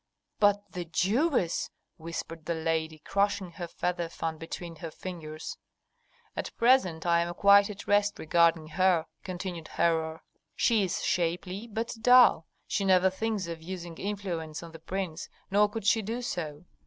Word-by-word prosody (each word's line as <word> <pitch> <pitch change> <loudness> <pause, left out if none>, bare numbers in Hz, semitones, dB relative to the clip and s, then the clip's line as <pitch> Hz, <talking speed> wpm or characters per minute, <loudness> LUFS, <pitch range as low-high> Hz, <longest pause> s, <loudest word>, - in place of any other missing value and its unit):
"But 205 -1 +3
the 180 -1 -5
Jewess!" 190 - +1 0.3
whispered 165 -1 -6
the 170 - 0
lady, 160 -1 -1
crushing 200 +2 0
her 175 +1 -6
feather 175 0 -2
fan 160 -1 -4
between 165 0 -7
her 165 +1 -6
fingers. 155 -2 -7 0.8
"At - - -5
present 210 -10 +3
I 170 -1 +4
am 170 0 -2
quite 200 +2 +6
at 200 -2 -8
rest 205 0 +2
regarding 165 0 +3
her," 180 -1 +3 0.2
continued 180 -3 -5
Herhor. 160 -1 0 0.3
"She 225 -3 +3
is 185 - -2
shapely, 180 +5 -1
but 225 +1 -3
dull; 245 -9 +6 0.2
she 200 - -1
never 190 -1 +4
thinks 210 0 -2
of 165 -1 -6
using 175 -1 -7
influence 175 -6 -4
on 165 - -9
the 165 - -11
prince, 175 0 -4 0.2
nor 205 +1 +4
could 215 -1 -6
she 220 +1 +4
do 230 +4 -4
so. 155 -6 -4
175 Hz, 155 wpm, -29 LUFS, 165-200 Hz, 0.8 s, quite